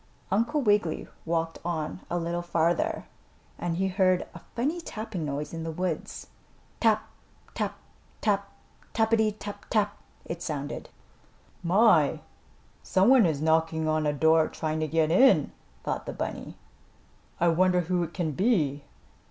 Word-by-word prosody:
Uncle 235 +9 +1
Wiggily 205 -7 +1 0.2
walked 165 0 -1
on 160 -1 -3
a 175 - -1
little 170 0 -2
farther 170 -1 0 0.5
and 170 -1 -2
he 190 +1 +1
heard 185 -1 +2
a - - -9 0.2
funny 295 +9 -1
tapping 215 - -5
noise 150 +1 -4
in 165 - -4
the 165 - -3
woods. 170 -1 -3 0.5
"Tap! 220 -2 +2 0.5
Tap! - - -2 0.4
Tap! 200 -2 0 0.5
Tappity 220 -1 +2
tap 205 -1 -8
tap!" 205 -2 +1 0.3
it 170 +1 -5
sounded. 145 -4 -4 0.7
"My! 175 -4 +4 0.6
Some 190 +4 +3
one 255 -7 +7
is 150 -2 -1
knocking 160 0 +2
on 155 -1 +1
a - - +3
door 160 +2 +4
trying 155 0 -3
to 155 - 0
get 160 0 +1
in," 185 - +5 0.3
thought - - -3
the - - -3
bunny. - - -5 0.8
"I 175 - +4
wonder 180 +2 +3
who 175 +1 0
it 170 -1 -3
can 170 -4 -1
be?" 150 - +1
175 Hz, 145 wpm, -27 LUFS, 160-205 Hz, 0.8 s, one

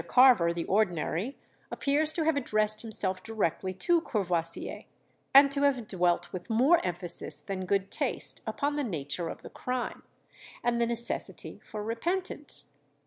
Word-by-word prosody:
Carver, 245 -10 +6
the 170 -1 -3
ordinary, 190 - 0 0.3
appears 300 +2 +1
to 325 - 0
have 320 -1 +2
addressed 215 -5 +2
himself 190 -4 -1
directly 190 -4 -1
to 335 - +2
Courvoisier, 175 - -2 0.5
and 275 +1 +8
to 280 0 +2
have 265 -6 +2
dwelt 175 -2 0
with 185 +4 -6
more 265 +10 +4
emphasis 175 -1 0
than 190 -2 -4
good 195 0 0
taste - - -2
upon 290 0 -1
the 290 - 0
nature 165 - -3
of - - -8
the - - -10
crime, 250 -1 -4 0.6
and 240 0 +1
the 235 - +3
necessity 235 0 -3
for 210 -1 -6
repentance. 340 - -2
215 Hz, 145 wpm, -29 LUFS, 180-270 Hz, 0.6 s, and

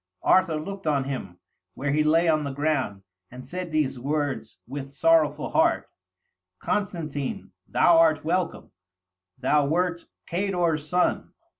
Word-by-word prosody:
Arthur 175 -5 +3
looked 195 +2 -7
on 145 -3 +2
him, 125 -10 -5 0.4
where 140 +1 -2
he 150 +1 +2
lay 165 +3 +3
on 155 -2 +2
the 140 - -3
ground, 135 -8 -1 0.3
and 125 +1 -10
said 180 +4 -5
these 140 -4 0
words, 145 +1 -2
with 135 +1 -7
sorrowful 155 -1 +3
heart: 335 +1 +2 0.7
'Constantine, 160 -9 -3 0.2
thou 170 -1 +4
art 155 -2 +3
welcome; 175 +1 -1 0.7
thou 140 +2 +2
wert 175 +2 0 0.2
Cador's 170 -5 -1
son. 180 0 0
155 Hz, 130 wpm, -25 LUFS, 140-175 Hz, 0.7 s, thou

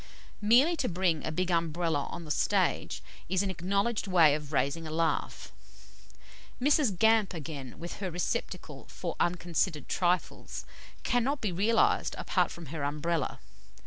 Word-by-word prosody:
Merely 250 +11 +5
to 255 - 0
bring 175 -3 +1
a 160 - -2
big 180 +3 -1
Umbrella 165 -2 0
on 170 - -7
the 150 - -4
stage - - +1 0.3
is 190 +1 +2
an 195 - -1
acknowledged 200 +5 -1
way 170 -6 +6
of 150 -1 -4
raising 145 +4 0
a - - -5
laugh. 165 +1 -1 1.1
Mrs. 270 - +3
Gamp 220 -2 +4
again, 145 -5 -7
with 170 +2 -7
her 190 -2 -3
receptacle 175 0 -4
for - - -5
unconsidered 170 -4 0
trifles, 180 -1 -1 0.4
cannot 255 +4 +1
be 210 - -1
realised 210 +6 +2
apart - - +1
from 170 - -9
her 155 -3 -3
Umbrella. 150 +3 -1
175 Hz, 145 wpm, -30 LUFS, 160-200 Hz, 1.1 s, way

